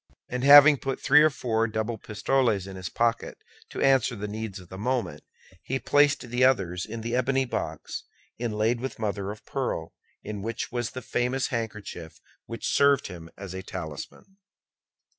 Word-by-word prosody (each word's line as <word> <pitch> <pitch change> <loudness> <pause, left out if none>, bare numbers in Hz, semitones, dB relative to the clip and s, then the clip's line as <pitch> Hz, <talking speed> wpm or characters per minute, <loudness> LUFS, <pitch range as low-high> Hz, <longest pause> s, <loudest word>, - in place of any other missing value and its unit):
And 125 0 -3
having 145 +1 +9
put 135 0 -3
three 145 +2 +6
or 155 - +6
four 115 -5 0
double 110 +1 -3
pistoles 105 -1 0
into 95 -1 -8
his 90 - -5
pocket 115 0 -1 0.3
to - - -3
answer 135 -3 +3
the 105 0 -5
needs 110 -1 -5
of 90 -2 -15
the 95 - -8
moment, 115 - -2 0.4
he 135 - -2
placed 145 +1 +3
the 125 +1 +2
others 95 -9 +2
in 115 +1 -6
the 115 +2 -2
ebony 130 +1 +1
box, 120 - -5 0.3
inlaid 115 0 0
with 130 - -5
mother 100 -2 -2
of 105 +1 -8
pearl, - - -3 0.3
in 105 -1 -5
which 115 +3 -4
was 120 -2 -2
the 130 - -8
famous 125 +3 -1
handkerchief 105 -8 -5 0.3
which 115 0 -5
served 140 -4 +4
him 85 -3 -9
as 95 -2 -7
a 95 - -5
talisman. 95 - -8
115 Hz, 170 wpm, -26 LUFS, 100-130 Hz, 0.4 s, having